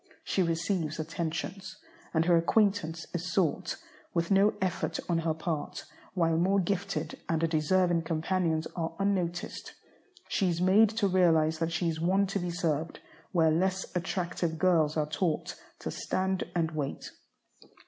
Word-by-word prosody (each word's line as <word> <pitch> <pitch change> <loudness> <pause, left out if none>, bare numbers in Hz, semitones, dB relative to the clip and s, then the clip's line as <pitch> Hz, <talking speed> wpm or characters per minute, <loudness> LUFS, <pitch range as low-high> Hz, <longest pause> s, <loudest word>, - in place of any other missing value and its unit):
She 190 - 0
receives 165 -2 -1
attentions, 165 +4 -4 0.3
and 160 -1 +2
her 175 0 +5
acquaintance 170 -2 +2
is 175 +1 -3
sought, 170 -4 0 0.4
with 170 +2 0
no 200 +2 +4
effort 185 -2 -1
on 170 -2 +1
her 160 -1 0
part, 160 -2 -4 0.3
while 165 -3 +2
more 190 +4 +3
gifted 180 -4 -2
and 165 0 +2
deserving 170 +2 +2
companions 165 0 0
are 165 -1 -3
unnoticed. 185 -3 -2 0.5
She 190 - +1
is 170 -1 -1
made 195 +4 +5
to 205 -3 +3
realize 160 -4 +3
that 165 0 0
she 170 +1 0
is 160 -1 -2
one 190 +4 +3
to 200 - +1
be 175 -1 -3
served, 165 -2 -1 0.3
where 160 -3 +4
less 185 +4 0
attractive 175 -2 -2
girls 160 -3 +3
are 155 - +2
taught 155 +2 -1 0.3
to - - -3
"stand 190 0 -1
and 165 -2 +1
wait." 150 -3 -4
170 Hz, 150 wpm, -29 LUFS, 160-185 Hz, 0.5 s, her